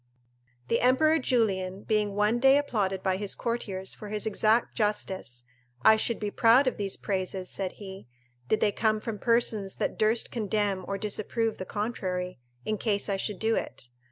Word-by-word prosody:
The 230 Hz, -, +1 dB
Emperor 310 Hz, +6 st, +4 dB
Julian 195 Hz, -7 st, 0 dB
being 210 Hz, -2 st, 0 dB
one 210 Hz, +3 st, +2 dB
day 270 Hz, +2 st, +6 dB
applauded 205 Hz, -9 st, -1 dB
by 190 Hz, -1 st, +1 dB
his 200 Hz, 0 st, -2 dB
courtiers 200 Hz, -6 st, -3 dB
for 210 Hz, -, -9 dB
his 210 Hz, 0 st, -2 dB
exact 220 Hz, +2 st, +2 dB
justice: 190 Hz, -, -2 dB, 0.4 s
"I 220 Hz, -, +8 dB
should 225 Hz, +1 st, 0 dB
be 210 Hz, -1 st, -3 dB
proud 235 Hz, +6 st, +5 dB
of 255 Hz, -, 0 dB
these 200 Hz, -2 st, -2 dB
praises," 185 Hz, -2 st, -3 dB
said 190 Hz, -2 st, -3 dB
he, 190 Hz, -6 st, -10 dB, 0.4 s
"did 220 Hz, -, +1 dB
they 210 Hz, -, +3 dB
come 215 Hz, +1 st, +1 dB
from 215 Hz, -1 st, -5 dB
persons 220 Hz, -4 st, +1 dB
that -, -, -3 dB
durst 220 Hz, +2 st, +1 dB
condemn 205 Hz, -4 st, -1 dB
or 200 Hz, -, -2 dB
disapprove 215 Hz, +2 st, -2 dB
the 185 Hz, -, -4 dB
contrary, 185 Hz, -, -3 dB, 0.3 s
in 215 Hz, -1 st, -2 dB
case 205 Hz, -1 st, 0 dB
I 195 Hz, -, +1 dB
should 200 Hz, 0 st, -3 dB
do 225 Hz, +2 st, +1 dB
it." 120 Hz, -, -5 dB
210 Hz, 175 wpm, -28 LUFS, 195-225 Hz, 0.4 s, I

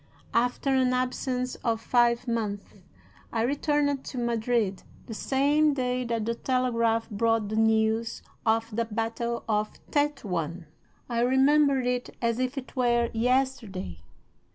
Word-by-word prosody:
"After 245 Hz, +3 st, +1 dB
an 255 Hz, -1 st, +3 dB
absence 255 Hz, 0 st, -1 dB
of 225 Hz, -2 st, +1 dB
five 240 Hz, +1 st, +2 dB
months 215 Hz, -4 st, -3 dB, 0.6 s
I 225 Hz, -1 st, 0 dB
returned 285 Hz, +1 st, +1 dB
to 260 Hz, -, -7 dB
Madrid 230 Hz, -4 st, 0 dB, 0.2 s
the 225 Hz, -, -7 dB
same 285 Hz, +5 st, +2 dB
day 250 Hz, -1 st, -1 dB
that 230 Hz, -2 st, -1 dB
the 230 Hz, -, 0 dB
telegraph 230 Hz, -3 st, 0 dB
brought 225 Hz, 0 st, +1 dB
the 215 Hz, -, -2 dB
news 220 Hz, +1 st, +1 dB, 0.2 s
of 225 Hz, 0 st, +1 dB
the 230 Hz, +1 st, +1 dB
battle 230 Hz, +2 st, -3 dB
of 215 Hz, -1 st, +1 dB, 0.2 s
Tetuan. 185 Hz, -, -1 dB, 0.4 s
I 235 Hz, -1 st, -1 dB
remember 270 Hz, +3 st, +4 dB
it 250 Hz, 0 st, -2 dB
as 235 Hz, 0 st, 0 dB
if 255 Hz, +2 st, -1 dB
it 265 Hz, +1 st, -7 dB
were 240 Hz, -2 st, +2 dB
yesterday. 230 Hz, -, -1 dB
235 Hz, 130 wpm, -27 LUFS, 225-255 Hz, 0.6 s, remember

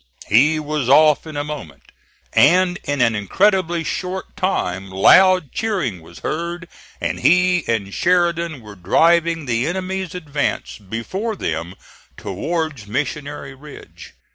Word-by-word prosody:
He 145 Hz, +9 st, +4 dB
was 150 Hz, -4 st, -2 dB
off 155 Hz, +2 st, +5 dB
in 155 Hz, -2 st, -7 dB
a 145 Hz, -, -1 dB
moment, 145 Hz, -, -9 dB, 0.4 s
and 180 Hz, +4 st, +4 dB
in 145 Hz, -2 st, -1 dB
an 115 Hz, -2 st, +3 dB
incredibly 175 Hz, -, +1 dB
short 185 Hz, +3 st, -5 dB
time 95 Hz, -, -2 dB
loud 180 Hz, -, +5 dB
cheering 180 Hz, -, -2 dB
was 85 Hz, +1 st, -14 dB
heard, 170 Hz, +2 st, -4 dB, 0.3 s
and -, -, -3 dB
he 180 Hz, 0 st, +3 dB
and 100 Hz, -4 st, -2 dB
Sheridan 170 Hz, -4 st, +1 dB
were 105 Hz, -2 st, -11 dB
driving 165 Hz, -, +2 dB
the 120 Hz, +1 st, 0 dB
enemy's 185 Hz, 0 st, -3 dB
advance 145 Hz, -9 st, -3 dB
before 115 Hz, -, -4 dB
them 85 Hz, -, -4 dB, 0.4 s
towards 145 Hz, -, -4 dB
Missionary 140 Hz, +3 st, -4 dB
Ridge. 145 Hz, +2 st, -13 dB
150 Hz, 125 wpm, -20 LUFS, 115-175 Hz, 0.4 s, off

